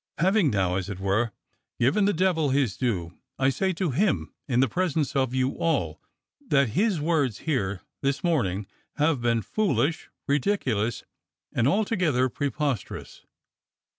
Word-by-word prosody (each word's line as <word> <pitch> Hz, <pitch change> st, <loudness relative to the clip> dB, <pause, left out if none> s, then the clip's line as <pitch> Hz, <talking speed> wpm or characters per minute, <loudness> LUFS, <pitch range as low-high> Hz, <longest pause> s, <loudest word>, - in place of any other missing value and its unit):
Having 190 Hz, -1 st, +3 dB
now, 95 Hz, -4 st, +1 dB
as 95 Hz, 0 st, -3 dB
it 95 Hz, -2 st, -5 dB
were, 100 Hz, +4 st, +1 dB, 0.5 s
given 140 Hz, -, +3 dB
the 205 Hz, -, +3 dB
devil 165 Hz, -5 st, +1 dB
his 130 Hz, -7 st, +1 dB
due, 90 Hz, -9 st, -2 dB, 0.2 s
I 135 Hz, 0 st, +3 dB
say 190 Hz, +8 st, 0 dB
to 175 Hz, -2 st, -1 dB
him, 130 Hz, -, 0 dB
in 125 Hz, -2 st, +1 dB
the 135 Hz, -, +4 dB
presence 160 Hz, -5 st, -1 dB
of 130 Hz, -2 st, +1 dB
you 130 Hz, 0 st, +2 dB
all, 165 Hz, -1 st, 0 dB, 0.5 s
that 140 Hz, -, +3 dB
his 195 Hz, -, +1 dB
words 145 Hz, -7 st, 0 dB
here 100 Hz, -, -1 dB, 0.2 s
this 140 Hz, +5 st, -1 dB
morning 105 Hz, -, 0 dB, 0.3 s
have 150 Hz, -3 st, +1 dB
been 115 Hz, -2 st, +1 dB
foolish, 160 Hz, -, 0 dB, 0.2 s
ridiculous, 130 Hz, -, 0 dB, 0.5 s
and 120 Hz, +1 st, +2 dB
altogether 180 Hz, -, +2 dB
preposterous. 140 Hz, -3 st, -3 dB
135 Hz, 140 wpm, -26 LUFS, 115-165 Hz, 0.5 s, the